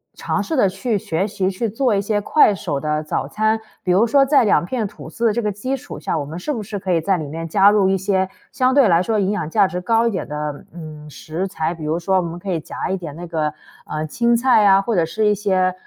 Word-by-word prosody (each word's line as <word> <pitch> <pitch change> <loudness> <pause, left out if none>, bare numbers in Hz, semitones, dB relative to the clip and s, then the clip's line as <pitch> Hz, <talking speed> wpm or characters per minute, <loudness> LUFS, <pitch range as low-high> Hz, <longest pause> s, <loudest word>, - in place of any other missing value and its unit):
尝 - - -2
试 320 -4 -3
着 200 - +4
去 205 +4 -1
学 175 -1 -2
习， 190 -2 -1
去 215 +4 -2
做 230 0 +1
一 195 - +1
些 205 +1 0
快 210 0 +4
手 160 -7 -3
的 150 +1 -1
早 155 - -2
餐。 215 +1 0 0.3
比 180 - 0
如 210 +5 +4
说 275 +3 +4
在 275 -2 +4
两 200 -4 +3
片 235 0 -2
吐 200 - -9
司 235 - -3
的 - - +3
这 235 - -1
个 210 - -1
基 255 +7 -3
础 - - -9
下， 160 - -2
我 145 - -3
们 160 +4 -7
是 300 +12 -3
不 230 -6 -3
是 205 0 -5
可 190 -1 -3
以 170 - +3
在 190 +4 +1
里 155 - -4
面 165 +2 -5
加 200 +4 +5
入 200 -2 +3
一 195 - +2
些 190 0 0 0.2
相 255 0 +1
对 270 -8 +5
来 170 +1 +4
说 220 +2 0
营 200 0 +1
养 185 -7 -3
价 200 +2 +4
值 180 -1 -3
高 230 +5 +2
一 - - -3
点 190 - -4
的， 150 -1 -5
嗯， 155 -3 -10
食 160 +6 -5
材。 160 -2 -2
比 160 -2 -8
如 155 +2 0
说 190 +2 +1
我 - - +3
们 170 0 -5
可 190 +1 -5
以 165 - 0
夹 - - -5
一 190 - -1
点 160 -5 -8
那 175 - -7
个， 155 -3 -2 0.3
呃， 155 0 -4
青 235 +7 +1
菜 235 -3 +4
啊， 195 0 +6
或 230 +3 -2
者 170 -4 +2
是 215 +6 -1
一 210 - +4
些， 185 -3 +1
195 Hz, 300 characters per minute, -20 LUFS, 165-215 Hz, 0.3 s, 啊